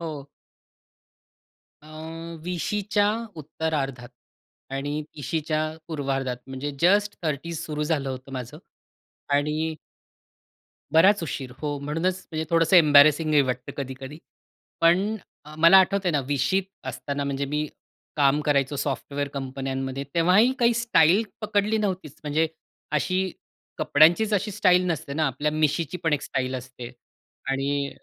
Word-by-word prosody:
हो. 150 Hz, -4 st, -6 dB, 1.6 s
अ, -, -, -16 dB, 0.6 s
20शी 180 Hz, +4 st, -2 dB
च्या 205 Hz, -1 st, +3 dB, 0.3 s
उत्तरार्धात 145 Hz, -5 st, -3 dB, 0.7 s
आणि 145 Hz, +2 st, -3 dB
30शी 155 Hz, +2 st, -2 dB
च्या 155 Hz, 0 st, -1 dB, 0.3 s
पूर्वार्धात 135 Hz, -5 st, -2 dB
म्हणजे 135 Hz, +2 st, -5 dB
जस्ट 205 Hz, +4 st, +3 dB
30's 160 Hz, +1 st, -3 dB
सुरु 150 Hz, -1 st, -3 dB
झालं 150 Hz, -3 st, -1 dB
होतं 130 Hz, +1 st, -8 dB
माझं 125 Hz, -2 st, -6 dB, 0.8 s
आणि 155 Hz, +2 st, 0 dB, 1.2 s
बराच 190 Hz, +5 st, +5 dB
उशीर 135 Hz, -5 st, -4 dB
हो, 145 Hz, -1 st, -2 dB
म्हणूनच 165 Hz, +6 st, -2 dB
म्हणजे 160 Hz, -1 st, -2 dB
थोडंसं 165 Hz, +2 st, +4 dB
एम्बॅरेसिंगही 150 Hz, -1 st, +6 dB
वाटतं 125 Hz, 0 st, -3 dB
कधी-कधी. 135 Hz, +2 st, -6 dB, 0.6 s
पण 185 Hz, +6 st, +3 dB, 0.3 s
अ, 150 Hz, +1 st, -11 dB
मला 170 Hz, +4 st, +8 dB
आठवतं 190 Hz, 0 st, +2 dB
आहे -, -, +3 dB
ना, 145 Hz, -, +2 dB
20शीत 145 Hz, +7 st, +1 dB, 0.2 s
असताना 140 Hz, 0 st, -4 dB
म्हणजे 140 Hz, 0 st, -2 dB
मी 150 Hz, 0 st, 0 dB, 0.5 s
काम 145 Hz, 0 st, +3 dB
करायचो 140 Hz, -1 st, +1 dB
सॉफ्टवेअर 140 Hz, +1 st, -3 dB
कंपन्यांमध्ये 135 Hz, 0 st, -4 dB
तेव्हाही 185 Hz, +9 st, +4 dB
काही 235 Hz, -1 st, +4 dB
स्टाईल 210 Hz, -5 st, +4 dB, 0.2 s
पकडली 210 Hz, 0 st, +1 dB
नव्हतीच. 185 Hz, -8 st, -3 dB
म्हणजे 155 Hz, +2 st, +1 dB, 0.5 s
अशी 185 Hz, 0 st, -1 dB, 0.5 s
कपड्यांचीच 170 Hz, +9 st, +4 dB
अशी 205 Hz, +2 st, 0 dB
स्टाईल 180 Hz, -2 st, +3 dB
नसते 140 Hz, -3 st, -3 dB
ना, 155 Hz, +1 st, +1 dB
आपल्या 135 Hz, +3 st, -1 dB
मिशीची 155 Hz, +2 st, 0 dB
पण 160 Hz, -, +2 dB
एक 145 Hz, -, +1 dB
स्टाईल 130 Hz, -1 st, -2 dB
असते. 125 Hz, -1 st, -7 dB, 0.6 s
आणि 140 Hz, +1 st, -1 dB
150 Hz, 125 wpm, -25 LUFS, 140-175 Hz, 1.6 s, मला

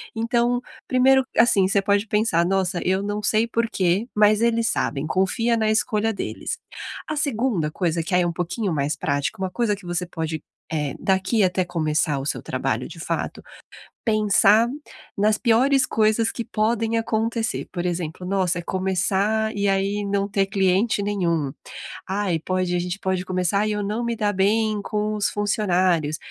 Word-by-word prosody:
Então, 235 Hz, +2 st, +1 dB, 0.3 s
1º, 265 Hz, +1 st, +4 dB
assim, 200 Hz, -5 st, +5 dB
você 195 Hz, 0 st, +2 dB
pode 200 Hz, +2 st, +1 dB
pensar: 210 Hz, -6 st, +2 dB
"Nossa, 190 Hz, -1 st, 0 dB
eu 190 Hz, +1 st, +2 dB
não 205 Hz, +1 st, -3 dB
sei 220 Hz, +2 st, +2 dB
por 230 Hz, 0 st, 0 dB
quê", 190 Hz, +5 st, +1 dB
mas 210 Hz, 0 st, +4 dB
eles 230 Hz, -1 st, +2 dB
sabem, 145 Hz, -6 st, -1 dB
confia 225 Hz, +6 st, +1 dB
na 220 Hz, -1 st, +1 dB
escolha 215 Hz, 0 st, +1 dB
deles. -, -, -4 dB, 0.5 s
A 305 Hz, -, -2 dB
2ª 235 Hz, -, 0 dB
coisa, 180 Hz, +2 st, -1 dB, 0.2 s
que, 165 Hz, -, -5 dB
aí, 180 Hz, -, +4 dB
é -, -, +1 dB
um 170 Hz, -, -2 dB
pouquinho 180 Hz, +2 st, -2 dB
mais 145 Hz, +1 st, 0 dB
prática, 145 Hz, +7 st, -2 dB
uma 190 Hz, -, -1 dB
coisa 220 Hz, +1 st, 0 dB
que 195 Hz, -2 st, -15 dB
você 175 Hz, +1 st, -2 dB
pode, 160 Hz, -2 st, -4 dB, 0.3 s
eh, 150 Hz, -4 st, -2 dB
daqui 190 Hz, +3 st, +1 dB
até 185 Hz, 0 st, +2 dB
começar 155 Hz, -4 st, 0 dB
o 135 Hz, -, -5 dB
seu -, -, -2 dB
trabalho, -, -, -2 dB
de -, -, -11 dB
fato, -, -, -3 dB, 0.6 s
pensar 215 Hz, 0 st, +4 dB, 0.5 s
nas 210 Hz, +1 st, +2 dB
piores 260 Hz, +3 st, +3 dB
coisas 220 Hz, +1 st, +2 dB
que 235 Hz, -, -4 dB
podem 225 Hz, +1 st, 0 dB
acontecer, 225 Hz, 0 st, -1 dB
por 175 Hz, -1 st, -2 dB
exemplo: 175 Hz, 0 st, -3 dB
"Nossa, 185 Hz, -2 st, 0 dB
começar 195 Hz, +4 st, 0 dB
e 200 Hz, 0 st, +1 dB
aí 195 Hz, +1 st, 0 dB
não 200 Hz, 0 st, 0 dB
ter 195 Hz, -1 st, +1 dB
cliente 195 Hz, +2 st, +1 dB
nenhum. 170 Hz, -8 st, 0 dB, 0.6 s
Ai, 190 Hz, -3 st, 0 dB
pode 185 Hz, +1 st, -1 dB
a -, -, +1 dB
gente 180 Hz, +2 st, -3 dB
pode 185 Hz, -1 st, -1 dB
começar 185 Hz, +3 st, 0 dB
e 215 Hz, -, 0 dB
eu 210 Hz, 0 st, -1 dB
não 215 Hz, +4 st, -2 dB
me 235 Hz, -, -1 dB
dar 210 Hz, -2 st, 0 dB
bem 215 Hz, +2 st, +1 dB
com 210 Hz, 0 st, -2 dB
os 205 Hz, -1 st, +1 dB
funcionários", 185 Hz, -7 st, +1 dB
200 Hz, 170 wpm, -23 LUFS, 180-220 Hz, 0.6 s, assim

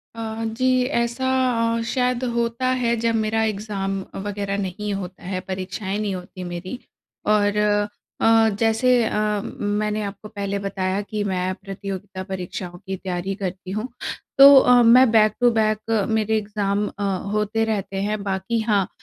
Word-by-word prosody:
अ, 225 Hz, 0 st, -4 dB
जी। 255 Hz, 0 st, +3 dB, 0.2 s
ऐसा 235 Hz, +2 st, -1 dB, 0.5 s
अ, -, -, -1 dB
शायद 250 Hz, 0 st, 0 dB
होता 235 Hz, +2 st, 0 dB
है 235 Hz, 0 st, +2 dB
जब 230 Hz, 0 st, +1 dB
मेरा 220 Hz, 0 st, +1 dB
एग्ज़ाम 200 Hz, -2 st, -2 dB, 0.3 s
वग़ैरह 200 Hz, -1 st, -2 dB
नहीं 200 Hz, +1 st, -3 dB
होता 185 Hz, -2 st, -6 dB
है, 185 Hz, 0 st, -3 dB
परीक्षाएँ 190 Hz, +1 st, -4 dB
नहीं 205 Hz, -3 st, -1 dB
होती 180 Hz, 0 st, -8 dB
मेरी। 180 Hz, +7 st, -6 dB, 0.5 s
और 210 Hz, -1 st, +3 dB, 0.6 s
अ, 225 Hz, 0 st, +5 dB
जैसे 235 Hz, +2 st, +3 dB
अ, -, -, -2 dB
म 210 Hz, -1 st, -2 dB, 0.2 s
मैंने 215 Hz, 0 st, -1 dB
आपको 200 Hz, +1 st, -7 dB
पहले 200 Hz, -2 st, -3 dB
बताया 195 Hz, 0 st, -2 dB
कि 205 Hz, 0 st, -3 dB
मैं 185 Hz, -1 st, -1 dB
प्रतियोगिता 195 Hz, -1 st, -7 dB
परीक्षाओं 180 Hz, -1 st, -5 dB
की 190 Hz, -, -2 dB
तैयारी 185 Hz, +1 st, -3 dB
करती 185 Hz, -2 st, -5 dB
हूँ। 215 Hz, +5 st, -2 dB, 0.5 s
तो 275 Hz, +1 st, +10 dB
अ, 245 Hz, -1 st, +5 dB
मैं 245 Hz, +2 st, +7 dB
बैक 215 Hz, -2 st, +5 dB
टू 245 Hz, -, +6 dB
बैक 215 Hz, -1 st, +1 dB, 0.3 s
मेरे 220 Hz, 0 st, +1 dB
एग्ज़ाम 205 Hz, -1 st, -1 dB
अ, 205 Hz, -, -6 dB, 0.3 s
होते 210 Hz, +1 st, 0 dB
रहते 195 Hz, -3 st, -2 dB
हैं। 210 Hz, 0 st, -1 dB
बाकी 195 Hz, +4 st, -1 dB
हाँ 205 Hz, -4 st, +1 dB
210 Hz, 155 wpm, -22 LUFS, 195-225 Hz, 0.6 s, तो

